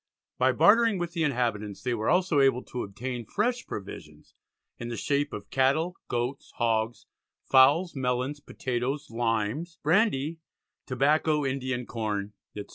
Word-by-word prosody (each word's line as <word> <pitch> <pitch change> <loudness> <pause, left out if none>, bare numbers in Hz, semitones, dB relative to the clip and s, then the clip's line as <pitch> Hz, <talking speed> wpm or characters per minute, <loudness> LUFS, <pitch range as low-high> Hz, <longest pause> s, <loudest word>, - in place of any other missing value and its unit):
By - - +4
bartering 225 0 +5
with 175 -1 -3
the 170 - -2
inhabitants 115 -8 -1
they 125 -1 0
were 110 -1 -1
also 180 -4 +3
able 135 -2 +3
to 125 - -5
obtain 120 +5 -5
fresh 240 - -1
provisions 100 -2 -9 0.5
in 120 - -5
the 120 -1 -4
shape 145 0 0
of 105 - -8
"Cattel, 140 +7 +2
Goats, 120 +3 -3
Hogs, 115 -1 0 0.4
Fowls, 145 +7 +5
Melons, 130 +2 -1
Potatoes, 130 0 -3
Limes, 115 +8 -1
Brandy, 165 -3 +2 0.5
Tobacco, 150 +3 +2
Indian 130 -2 -2
Corn, 105 -3 -3 0.2
etc." 105 -1 -7
130 Hz, 135 wpm, -27 LUFS, 120-150 Hz, 0.5 s, bartering